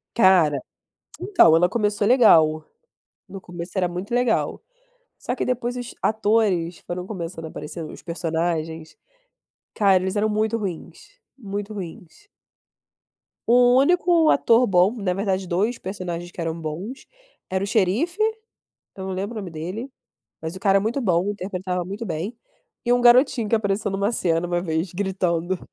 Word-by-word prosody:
Cara, 180 -9 +5 0.6
então 395 - +5
ela 175 +2 +4
começou 205 0 0
legal, 160 -11 +5 0.7
no 195 - -8
começo 175 +1 -8
era 180 - +2
muito 180 +5 -6
legal. 245 -2 +1 0.6
Só 250 - -3
que - - -1
depois 245 0 -2
os 245 -1 -6
atores 210 -6 +1
foram 180 +1 -5
começando 170 -5 -6
a - - -5
aparecer 160 +2 -7
os - - -10
personagens, 165 -1 -3 0.8
cara 195 -4 +3
eles 190 +1 -2
eram 210 +1 +1
muito 215 +1 0
ruins, 175 -5 -7 0.2
muito 205 -2 -5
ruins. 195 - -9 1.2
O 245 +1 +5
único 345 +2 +4
ator 240 -1 +4
bom, 185 +1 +3
na 195 -5 -1
verdade 195 -1 -1
2 205 +8 0
personagens 175 -2 -5
que 175 - -9
eram 165 0 -3
bons, 175 - -6 0.4
era 190 +1 -1
o - - -3
xerife, 220 - +1 0.8
eu 190 - -7
não 190 - -3
lembro 200 +5 -4
o - - -3
nome 190 - -7
dele, 180 - -6 0.5
mas 160 +3 -5
o - - -9
cara 195 0 +4
é - - -1
muito 225 +7 -1
bom 185 -3 +1
interpretava 185 -2 -4
muito 200 +5 -6
bem, 180 +5 -4 0.5
e 240 - +2
um 245 - +3
garotinho 245 -2 +5
que 230 - +2
apareceu 205 -1 0
em - - -4
uma 200 +3 0
cena 170 -5 0
uma 175 0 -1
vez 165 0 -2
gritando. 185 -2 -1
190 Hz, 160 wpm, -23 LUFS, 175-220 Hz, 1.2 s, Cara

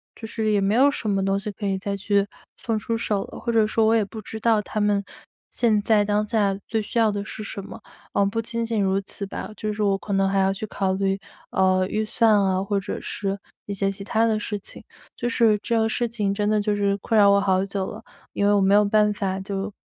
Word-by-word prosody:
就 225 - -9
是 220 -1 -2
也 205 -1 +2
没 195 +1 +1
有 270 +5 +5
什 225 -6 -3
么 195 -1 +1
东 195 0 +1
西 200 +1 -4
可 205 +1 -7
以 195 -1 0
再 200 +1 -3
去， 200 0 +1 0.3
送 225 -2 -2
出 230 +2 -2
手 210 -3 -1
了， - - -11
或 235 - -1
者 220 -2 +3
说 220 +1 +2
我 220 - +4
也 225 -2 +3
不 215 +2 -9
知 220 +2 -7
道 225 -1 +3
他 215 - -4
们 205 -1 +2 0.5
现 220 -4 +2
在， 210 0 +3
当 210 +1 0
下 205 -3 +1
最 225 -1 0
需 210 - -5
要 220 -2 +4
的 205 0 -3
是 215 - -6
什 200 - -6
么。 200 - -10 0.3
嗯， 200 - +3
不 225 +3 -1
仅 230 0 -3
仅 225 -2 0
如 195 0 +1
此 200 +1 -6
吧， 195 - -6
就 215 0 -2
是 210 - -4
我 200 -1 +2
可 200 +1 -5
还 195 0 +1
要 190 0 +2
去 200 +2 -5
考 190 -2 -1
虑， 195 0 0 0.3
呃， 185 0 +2
预 215 +2 -1
算 225 +1 +3
啊、 190 -1 +1
或 200 0 0
者 195 - -5
是 195 -1 -3 0.3
一 200 - -4
些 195 0 0
其 195 0 -9
它 225 +2 +1
的 220 -2 +1
事 210 0 -3
情， - - -10 0.3
就 240 - -3
是 230 -3 +3
这 235 - -1
要 225 -1 +3
事 240 +2 0
情 210 -4 -1
真 205 +1 -1
的 215 -1 +2
就 205 0 0
是 200 -1 +1
困 220 +3 0
扰 200 -1 +7
我 200 0 +4
好 190 -1 +2
久 195 -1 -3
了。 - - -8 0.3
因 200 - 0
为 205 - +4
我 200 - +3
没 195 +1 +4
有 210 +1 +6
办 210 0 +3
法 190 -2 -2
就， 195 +1 -4
205 Hz, 280 characters per minute, -24 LUFS, 195-220 Hz, 0.5 s, 扰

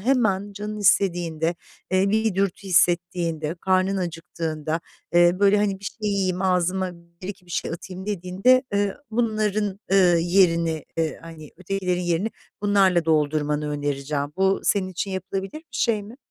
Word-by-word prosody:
hemen 205 -4 +1
canın 210 +1 -5
istediğinde, 175 -4 +2 0.4
eee, 185 +1 +2
bir 220 -2 +1
dürtü 195 0 0
hissettiğinde, 175 -3 +1
karnın 190 +1 +2
acıktığında, 165 -2 -3 0.3
eee, 175 0 +6
böyle, 200 +1 +5
hani, 200 -2 0
bir - - -12
şey 210 +1 -4
yiyeyim, 190 -2 0
ağzıma 185 0 +1
1-2 180 +3 -10
bir - - -16
şey - - -2
atayım 185 +3 -7
dediğinde, 200 +6 +2
eee, 200 -1 +1 0.2
bunların, 215 -3 0
ııı, 180 -3 +5
yerini, 170 -3 +2
eee, 160 -1 -1
hani, 160 -3 -11
ötekilerin 185 -1 -2
yerini 175 +5 0 0.3
bunlarla 190 -4 +3
doldurmanı 150 -1 +1
önereceğim. 145 0 -2
Bu 190 0 +2
senin 195 -2 +1
için 185 +2 -4
yapılabilir 190 - -4
bir 320 - -19
şey 220 -3 0
mi? 215 +4 -11
185 Hz, 145 wpm, -24 LUFS, 170-200 Hz, 0.4 s, eee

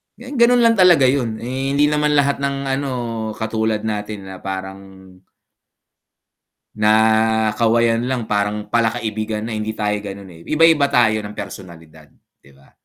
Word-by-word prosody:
ganun 245 -1 +2
lang 230 -1 +4
talaga 180 -6 +5
yun, 120 -5 -2
eh, 130 +3 -3
hindi 145 +1 +3
naman 150 0 +1
lahat 140 -1 +2
ng, 140 0 -1 0.2
ano, 140 0 -3 0.4
katulad 110 -1 -2
natin 105 -2 -5
na 95 - -8
parang 95 0 -6 2.0
na 110 +1 +2
kawayan 115 +1 +2
lang 130 -2 -2
parang 105 +1 -1
pala-kaibigan 110 -2 -1
na, 115 - -5
hindi 110 0 -4
tayo 105 -1 -1
ganon, 100 -2 -9
eh, 80 - -14
iba-iba 155 -2 +4
tayo 120 -5 +2
ng 105 0 -8
personalidad 80 -5 -10 0.3
'di 70 - -21
ba? 70 0 -23
110 Hz, 140 wpm, -19 LUFS, 105-140 Hz, 2.0 s, talaga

